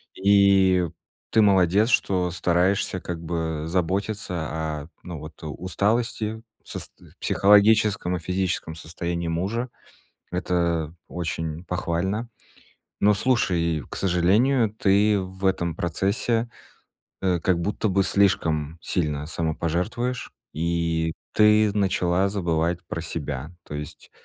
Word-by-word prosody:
И 95 -2 +4 0.4
ты 110 - +5
молодец, 100 +2 +4
что 90 -7 +2
стараешься 90 +2 +1
как 85 -2 -5
бы 80 -2 -3
заботиться 95 +4 -1 0.5
о, 75 - -13 0.2
ну, 85 -4 -7
вот, 75 +2 -9
усталости 110 +6 -1 0.2
в - - -26
сост - - -7
в - - -19
психологическом 105 -2 +4
и - - -7
физическом 90 -1 -2
состоянии 85 +1 -4
мужа. 100 +10 -2 0.6
Это 85 -3 -1
очень 80 -1 -4
похвально, 90 +5 -2 0.7
но 105 +1 +5
слушай, 90 - +1
к - - -6
сожалению, 105 +7 +2
ты 105 0 +3
в 95 +1 -8
этом 85 -3 +1
процессе, 100 +8 0 0.7
э, 90 -2 +1
как 85 0 +1
будто 105 +4 -1
бы 95 +1 +3
слишком 80 -6 +1
сильно 75 -4 -2
самопожертвуешь, 85 +10 -2 0.2
и 80 0 0 0.2
ты 105 0 +5
начала 95 -2 +1
забывать 85 -3 0
про 85 - -4
себя. 75 -3 -5
То - - -8
есть 75 0 -8
90 Hz, 115 wpm, -24 LUFS, 85-100 Hz, 0.7 s, ты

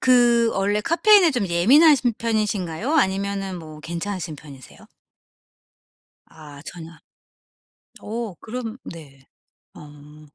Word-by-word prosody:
그 240 -2 +4
원래 205 +2 0
카페인에 360 - +4
좀 245 -8 -2
예민하신 250 - +4
편이신가요? 215 - -2
아니면은 195 - -1
뭐 155 -2 -11
괜찮으신 170 0 -5
편이세요? 140 -3 -15 1.4
아, 145 -2 -14
전혀 165 -2 -10 1.1
어 225 -2 -5
그럼 230 0 -6
네. 140 -5 -12 0.5
어 150 +1 -15
195 Hz, 220 characters per minute, -22 LUFS, 160-235 Hz, 1.4 s, 그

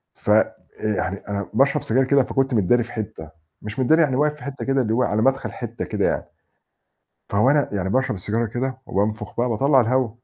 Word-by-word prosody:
ف - - -7
آآ - - +4 0.4
يعني 95 +1 -2
أنا 100 0 -3
باشرب 140 +4 +2
سجاير 130 +4 +2
كده، 140 0 +4
فكنت 135 +1 -1
متداري 115 +3 +3
في 120 - -12
حتّة، 95 -8 -6 0.3
مش 105 +5 -7
متدّاري 160 +6 +4
يعني 140 -5 +2
واقف 150 +2 +1
في 150 - -14
حتّة 140 +1 -6
كده 135 0 +2
اللي 110 -3 -1
هو 125 +3 +2
على 110 -3 0
مَدخَل 135 +2 +1
حتّة - - -5
كده - - -1
يعني. - - 0 1.0
فوأنا 130 +8 +3
يعني 95 -2 -2
باشرب 130 +2 +1
السيجارة 105 +5 -2
كده 130 +4 -3
وبانفُخ 105 +2 -2
بقى 120 +1 +2
باطلّع 135 +4 +3
الهَوا، 125 +1 +1
125 Hz, 200 wpm, -22 LUFS, 105-135 Hz, 1.0 s, آآ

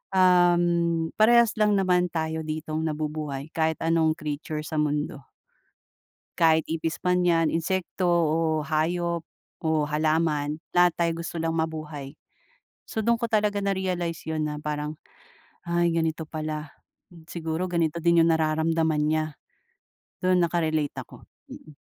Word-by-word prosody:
uhm, 175 -2 +3
parehas 235 +1 +6
lang 210 -1 +4
naman 180 -2 +2
tayo 160 -1 -3
ditong 155 +1 -3
nabubuhay 150 -1 -4
kahit 160 -1 0
anong 165 -1 +2
creature 155 0 -4
sa 155 0 -3
mundo. 145 -2 -2 1.1
Kahit 160 -1 +4
ipis 160 0 -3
man 180 0 +3
yan, 165 -2 +3
insekto, 180 +2 -1
o 165 -2 +2 0.3
hayop, 170 +2 0 0.4
o 160 -1 +1
halaman. 155 -1 0 0.2
Lahat 175 0 +5
tayo 170 -1 +1
gusto 170 0 -6
lang 165 0 -1
mabuhay. 155 -3 -4 0.7
So 220 - -3
dun 235 +2 +2
ko 235 - -2
talaga 210 -2 +1
narealize 180 -4 -2
yun 155 -1 -1
na 150 0 -4
parang, 150 0 -3 0.7
"Ay, 170 0 +2
ganito 160 -1 -1
pala. 155 -1 -5 0.6
Siguro 165 +1 -3
ganito 170 -2 0
din 170 0 +4
yung 165 - +4
nararamdaman 160 0 +1
niya." 155 +1 +1 1.0
doon 185 0 +4
naka-relate 160 -3 0
ako, - - -10 0.2
mm. 155 -2 -13
160 Hz, 130 wpm, -26 LUFS, 155-175 Hz, 1.1 s, parehas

